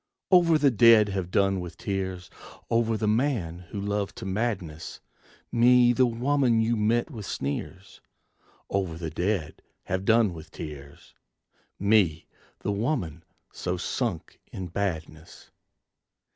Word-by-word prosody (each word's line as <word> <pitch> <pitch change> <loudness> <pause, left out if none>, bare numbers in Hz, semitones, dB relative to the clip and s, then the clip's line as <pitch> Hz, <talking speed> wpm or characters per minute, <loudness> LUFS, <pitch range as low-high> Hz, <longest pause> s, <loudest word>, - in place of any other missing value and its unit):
Over 170 -3 +6
the 145 -2 +3
dead 115 -2 +6
have 95 -3 -3
done 95 0 +2
with 90 -1 -7
tears! 95 -2 -4 0.4
Over 115 -1 +2
the 110 - -1
man 110 - 0
who 100 - -5
loved 100 0 -2
to - - -8
madness 95 -6 -3 0.5
Me 120 +1 +5
the 130 +1 +3
woman 125 0 +1
you 115 +1 +2
met 115 +6 +1
with 110 -7 -7
sneers, 95 +7 -5 0.7
Over 95 -5 -2
the 80 -2 -5
dead 90 -4 -2 0.2
have 95 +1 -2
done 110 -2 +3
with 80 -1 -10
tears! 70 -2 -10 0.6
Me 100 -6 +2 0.4
the - - -1
woman 100 - -2 0.3
so - - -3
sunk - - -3
in 90 -2 -6
badness. 80 -4 -5
100 Hz, 130 wpm, -26 LUFS, 90-115 Hz, 0.7 s, Over